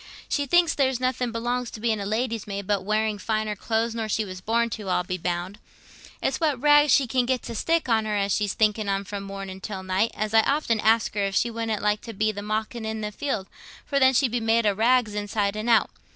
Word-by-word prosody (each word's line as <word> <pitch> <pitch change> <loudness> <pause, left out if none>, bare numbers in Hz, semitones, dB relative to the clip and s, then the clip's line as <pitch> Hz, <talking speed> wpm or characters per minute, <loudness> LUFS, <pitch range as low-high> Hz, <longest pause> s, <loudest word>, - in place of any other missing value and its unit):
She 285 -1 -1
thinks 345 +2 +4
there's 265 -3 +1
nothing 255 -1 -1
belongs 240 +1 -2
to - - -9
being 220 -1 0
a 200 - -4
lady's 225 0 -2
maid 200 -1 -4
but 200 -1 0
wearing 215 +1 0
finer 215 +1 -1
clothes 225 +2 -1
nor 225 -1 -3
she 215 +1 0
was 185 -1 -8
born 235 +3 0
to, 210 -3 -5
I'll 180 - +1
be 185 +1 -4
bound. 180 +4 -3 0.6
It's 265 - 0
what 300 -6 +1
rag 295 +1 +5
she 275 +1 +5
can 250 0 0
get 260 -1 0
to 235 - -6
stick 330 +8 0
on 225 -2 +2
her 210 -1 -1
as 200 -1 +1
she's 205 -2 0
thinking 215 -1 +1
on 195 0 0
from 200 0 -6
morning 195 -1 -7
till 195 -2 -6
night, 190 +4 +1
as 215 0 -3
I 225 - +7
often 275 -4 0
ask 225 +1 +2
her 205 -1 -1
if 195 0 -3
she 235 - +2
wouldn't 225 -2 -3
like 210 0 +1
to 230 - -8
be 215 +2 +1
the 205 -1 -6
mawkin 220 +2 -3
i' 220 0 -3
the - - -23
field, 225 -9 -2 0.4
for 280 - 0
then 260 -1 +5
she'd 250 -1 +3
be 240 - 0
made 225 0 +2
o' 205 - +3
rags 230 +1 +2
inside 205 0 -1
and 215 +3 -3
out. 225 -2 +4
220 Hz, 245 wpm, -25 LUFS, 205-240 Hz, 0.6 s, I